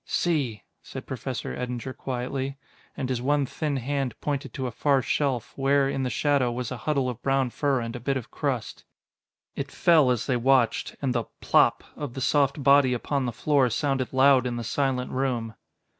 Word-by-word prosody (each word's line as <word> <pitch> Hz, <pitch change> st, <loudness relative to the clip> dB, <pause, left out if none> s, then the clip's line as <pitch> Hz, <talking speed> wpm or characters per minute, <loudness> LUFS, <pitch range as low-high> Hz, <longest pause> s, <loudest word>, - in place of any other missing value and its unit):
"See," 140 Hz, -, 0 dB, 0.2 s
said -, -, -8 dB
Professor 65 Hz, -, -4 dB
Eddinger 125 Hz, +1 st, -4 dB
quietly. 135 Hz, +2 st, -4 dB, 0.4 s
And 130 Hz, -, -2 dB
his 125 Hz, -2 st, -2 dB
one 145 Hz, +2 st, +2 dB
thin 145 Hz, +2 st, -2 dB
hand 135 Hz, 0 st, -2 dB
pointed 145 Hz, -2 st, -3 dB
to 130 Hz, -3 st, -3 dB
a 125 Hz, -, -2 dB
far 135 Hz, +3 st, +2 dB
shelf, 130 Hz, -5 st, -1 dB
where, 140 Hz, 0 st, +2 dB
in 135 Hz, 0 st, -2 dB
the 130 Hz, -, -1 dB
shadow, 135 Hz, +1 st, +1 dB
was 125 Hz, 0 st, -4 dB
a 125 Hz, -, -4 dB
huddle 140 Hz, -4 st, +1 dB
of 125 Hz, -1 st, -5 dB
brown 135 Hz, -2 st, +1 dB
fur 135 Hz, +3 st, +1 dB
and 115 Hz, 0 st, -5 dB
a -, -, -5 dB
bit 135 Hz, +3 st, -1 dB
of 125 Hz, -, -8 dB
crust. -, -, -3 dB, 0.7 s
It -, -, -4 dB
fell 160 Hz, -6 st, +4 dB
as 120 Hz, -3 st, 0 dB
they 130 Hz, -, +1 dB
watched, 125 Hz, -1 st, +2 dB
and 130 Hz, -2 st, +1 dB
the 120 Hz, -2 st, -1 dB
"plop" -, -, +3 dB
of 140 Hz, -5 st, -6 dB
the -, -, -4 dB
soft 140 Hz, +1 st, +2 dB
body 140 Hz, -2 st, +5 dB
upon 135 Hz, +2 st, -1 dB
the -, -, -1 dB
floor 135 Hz, +2 st, +2 dB
sounded 135 Hz, +1 st, -1 dB
loud 130 Hz, -1 st, +5 dB
in 120 Hz, -, -3 dB
the 120 Hz, -, -4 dB
silent 130 Hz, +1 st, -1 dB
room. 125 Hz, -4 st, -1 dB
130 Hz, 190 wpm, -26 LUFS, 125-140 Hz, 0.7 s, body